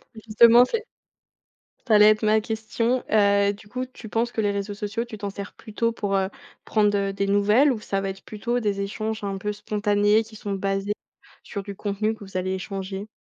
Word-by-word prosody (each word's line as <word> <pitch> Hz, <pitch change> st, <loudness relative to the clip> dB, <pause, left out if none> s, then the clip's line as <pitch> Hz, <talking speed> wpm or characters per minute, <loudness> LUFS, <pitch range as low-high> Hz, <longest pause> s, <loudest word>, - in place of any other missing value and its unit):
justement 230 Hz, +2 st, +6 dB
c'est 440 Hz, -, -3 dB, 1.0 s
ça 220 Hz, -, +5 dB
allait 210 Hz, 0 st, +8 dB
être 215 Hz, +1 st, -1 dB
ma 215 Hz, 0 st, +4 dB
question. 225 Hz, +3 st, -1 dB
Heu, 200 Hz, -1 st, +4 dB
du 205 Hz, +1 st, -15 dB
coup, 255 Hz, +4 st, -4 dB
tu 245 Hz, -3 st, -12 dB
penses 230 Hz, +3 st, -1 dB
que -, -, -5 dB
les 205 Hz, -1 st, +2 dB
réseaux 200 Hz, +1 st, -3 dB
sociaux, 210 Hz, +3 st, -3 dB
tu 225 Hz, -3 st, -9 dB
t'en 200 Hz, 0 st, -4 dB
sers 200 Hz, 0 st, -7 dB
plutôt 230 Hz, +1 st, -2 dB
pour, 205 Hz, -3 st, -2 dB
heu, 190 Hz, -1 st, +1 dB, 0.3 s
prendre, 210 Hz, -2 st, +2 dB
heu, 195 Hz, 0 st, 0 dB
des 200 Hz, 0 st, -2 dB
nouvelles 210 Hz, +8 st, +4 dB
ou 225 Hz, -, -5 dB
ça 195 Hz, -1 st, -2 dB
va 195 Hz, -, -3 dB
être 195 Hz, 0 st, -7 dB
plutôt 240 Hz, +3 st, -2 dB
des 205 Hz, -3 st, -1 dB
échanges 215 Hz, +2 st, -3 dB
un 195 Hz, -1 st, -3 dB
peu 210 Hz, +2 st, -3 dB
spontanés 210 Hz, +1 st, +1 dB
qui 220 Hz, 0 st, -13 dB
sont 205 Hz, -1 st, -4 dB
basés 195 Hz, +1 st, -1 dB, 0.5 s
sur 200 Hz, -, -5 dB
du 200 Hz, 0 st, -8 dB
contenu 210 Hz, +2 st, -1 dB
que 215 Hz, -, -12 dB
vous 190 Hz, -1 st, -6 dB
allez 185 Hz, 0 st, -1 dB
échanger? 195 Hz, +1 st, -5 dB
210 Hz, 210 wpm, -24 LUFS, 200-220 Hz, 1.0 s, allait